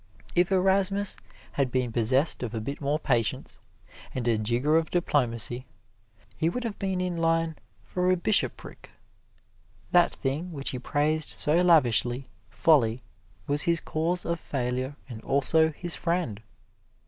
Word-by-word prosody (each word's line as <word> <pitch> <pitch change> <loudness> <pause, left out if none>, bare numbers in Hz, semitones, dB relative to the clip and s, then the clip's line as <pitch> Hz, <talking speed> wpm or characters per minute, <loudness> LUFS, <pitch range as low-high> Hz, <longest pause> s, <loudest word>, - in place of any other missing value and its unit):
If 175 +2 +2
Erasmus 195 +1 +2 0.4
had 135 -3 -1
been 125 -2 -1
possessed 130 +7 +1
of 120 -2 -4
a - - -2
bit 140 +7 -6
more 145 +2 0
patience 120 -8 -1 0.6
and 125 -2 -2
a 115 - +3
jigger 120 +8 +1
of 160 -1 +1
diplomacy, 125 -7 0 0.7
he 160 - 0
would 250 +7 -4
have 225 -3 -5
been 190 -2 -2
in 180 -1 -2
line 165 -1 +1 0.3
for 180 - -1
a 185 - +3
bishopric. 205 +4 0 1.0
That 175 -1 +4
thing 155 +6 -4
which 140 -2 -3
he 125 - -5
praised 150 +3 0
so 150 - +2
lavishly, 130 -7 +3 0.2
Folly, 125 -7 +2 0.4
was 145 +1 +1
his 170 -1 +3
cause 170 +4 -2
of 170 0 -2
failure 130 0 -3
and 115 -4 -9
also 160 +5 +2
his 175 +2 0
friend. 170 - -2
150 Hz, 145 wpm, -27 LUFS, 125-175 Hz, 1.0 s, That